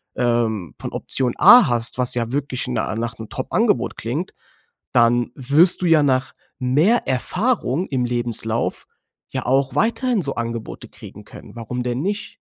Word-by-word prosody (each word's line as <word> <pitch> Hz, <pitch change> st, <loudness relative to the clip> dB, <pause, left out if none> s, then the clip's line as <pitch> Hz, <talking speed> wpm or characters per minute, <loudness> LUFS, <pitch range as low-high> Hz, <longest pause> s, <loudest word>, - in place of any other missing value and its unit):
ähm, 115 Hz, -, -1 dB
von -, -, -6 dB
Option 125 Hz, -3 st, 0 dB
A 245 Hz, -, +8 dB
hast, 120 Hz, -1 st, -1 dB
was 125 Hz, -1 st, +1 dB
ja 115 Hz, -1 st, -2 dB
wirklich 135 Hz, -2 st, -3 dB
na 120 Hz, -3 st, -2 dB
nach 115 Hz, 0 st, -4 dB
'nem 110 Hz, -2 st, -9 dB
Top-Angebot -, -, -1 dB
klingt, -, -, -4 dB, 0.6 s
dann 120 Hz, 0 st, +3 dB
wirst 150 Hz, +9 st, +3 dB
du -, -, 0 dB
ja 160 Hz, -2 st, +5 dB
nach 130 Hz, -2 st, 0 dB, 0.3 s
mehr 150 Hz, -, +2 dB
Erfahrung 180 Hz, -, -1 dB
im 125 Hz, -3 st, -1 dB
Lebenslauf 120 Hz, -1 st, -2 dB, 0.4 s
ja -, -, -4 dB
auch 135 Hz, +1 st, +1 dB
weiterhin 235 Hz, -, +1 dB
so 140 Hz, -4 st, -4 dB
Angebote 115 Hz, -1 st, -5 dB
kriegen -, -, -13 dB
können. -, -, -13 dB
Warum 125 Hz, +2 st, -5 dB
denn 125 Hz, +1 st, -2 dB
nicht? 205 Hz, +4 st, -4 dB
125 Hz, 155 wpm, -21 LUFS, 120-145 Hz, 0.6 s, A